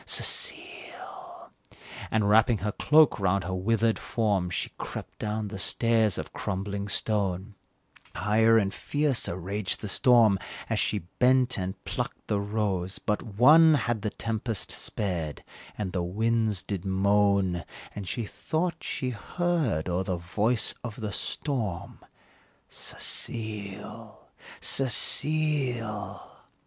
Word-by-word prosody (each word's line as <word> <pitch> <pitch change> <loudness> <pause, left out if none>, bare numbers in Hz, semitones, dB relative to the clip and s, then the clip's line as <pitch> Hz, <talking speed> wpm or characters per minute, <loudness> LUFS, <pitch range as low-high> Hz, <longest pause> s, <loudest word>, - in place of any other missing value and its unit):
Cecile!" - - -4 0.6
And, 110 -2 +1
wrapping 110 +2 +5
her 105 - +1
cloak 150 +2 +4
round 95 0 +1
her 95 - -4
withered 110 +4 +1
form, 100 -6 0
She 90 - -3
crept - - -7
down 105 0 -2
the 100 - -6
stairs 110 0 +2
of - - -6
crumbling 100 0 -3
stone; 100 -1 -1 0.6
Higher 110 +2 +4
and 100 -2 +1
fiercer 145 - 0
raged 95 +2 -2
the 105 - -5
storm 110 -1 +5 0.3
As - - +2
she - - 0
bent 130 0 +4
and 95 +1 -5
plucked - - -4
the 105 - +1
rose 100 -3 -1
but 105 - -1
one 150 +9 +6
Had 120 -5 -1
the 105 - -1
tempest 110 -4 -3
spared 85 -7 -3 0.3
and 95 -4 -3
the 90 - 0
winds 110 +2 0
did 95 -4 -4
moan, 100 -2 +2 0.3
And 100 -3 -6
she 120 - -2
thought 165 - -2
that - - -18
she 130 -1 -2
heard 135 - -1
o'er 90 +1 0
the 90 -1 -2
voice 105 +7 0
of 115 -4 -5
the 105 -2 -3
storm, 110 - -3 0.7
"Cecile! 105 0 -5 0.3
Cecile!" 130 -5 0
105 Hz, 125 wpm, -28 LUFS, 95-115 Hz, 0.7 s, one